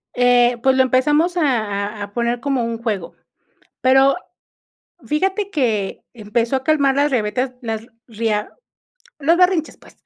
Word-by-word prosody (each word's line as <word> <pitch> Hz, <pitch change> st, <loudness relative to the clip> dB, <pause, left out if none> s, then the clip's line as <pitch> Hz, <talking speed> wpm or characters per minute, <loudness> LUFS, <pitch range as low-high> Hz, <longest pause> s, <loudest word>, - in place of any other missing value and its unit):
Eh, 245 Hz, -1 st, +4 dB
pues 265 Hz, +1 st, +3 dB
lo 260 Hz, -, +5 dB
empezamos 295 Hz, +7 st, +2 dB
a -, -, +2 dB, 0.6 s
a -, -, -2 dB
a 200 Hz, 0 st, -9 dB
poner 235 Hz, +1 st, -1 dB
como 270 Hz, -1 st, -1 dB
un 230 Hz, 0 st, -3 dB
juego, 205 Hz, -7 st, -3 dB, 0.7 s
pero 270 Hz, +1 st, +4 dB, 0.9 s
fíjate 385 Hz, +6 st, -1 dB
que 225 Hz, -, -1 dB
empezó 230 Hz, +3 st, -1 dB
a 265 Hz, -, -5 dB
calmar 280 Hz, -2 st, +2 dB
las 290 Hz, +1 st, +2 dB
rabietas, 245 Hz, +1 st, -1 dB
las 225 Hz, -2 st, -5 dB, 0.2 s
ria 220 Hz, -2 st, -2 dB, 0.7 s
los 325 Hz, +4 st, +3 dB
berrinches, 360 Hz, -3 st, +2 dB
pues. -, -, -19 dB
255 Hz, 145 wpm, -19 LUFS, 230-290 Hz, 0.9 s, lo